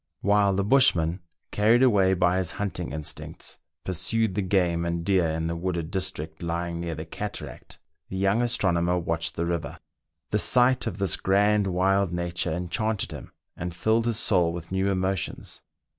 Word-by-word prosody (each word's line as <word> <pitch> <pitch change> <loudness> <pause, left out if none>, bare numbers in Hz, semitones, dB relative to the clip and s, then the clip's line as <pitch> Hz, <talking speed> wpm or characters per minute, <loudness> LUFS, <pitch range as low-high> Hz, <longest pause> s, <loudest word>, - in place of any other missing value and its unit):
While 100 -1 +3
the 100 - +1
bushman, 90 -8 +3 0.3
carried 115 +4 +4
away 100 -6 +4
by 90 0 +2
his 90 -3 -1
hunting 100 -9 -3
instincts, 75 0 -4 0.2
pursued 105 +4 -1
the 100 - -1
game 90 -3 +1
and 85 0 -2
deer 95 -3 +3
in 80 +1 -2
the 85 +1 -2
wooded 85 -1 -3
district 90 -5 -3
lying 85 0 -3
near 85 -1 -3
the 80 +2 -6
cataract, 80 -6 -7 0.3
the 95 - -5
young 100 +4 +2
astronomer 90 -7 +1
watched 80 -1 -2
the 85 - -1
river. 85 -1 -3 0.5
The - - +2
sight 125 +1 +3
of 90 - -4
this 100 -2 +1
grand, 105 +1 +2
wild 95 +1 +1
nature 85 0 -2
enchanted 95 +5 -2
him, - - -9 0.2
and 90 0 -5
filled 110 +5 +1
his 115 -2 0
soul 90 -7 +2
with 85 0 -8
new 95 +1 +1
emotions. 95 -1 -2
95 Hz, 165 wpm, -26 LUFS, 85-100 Hz, 0.5 s, carried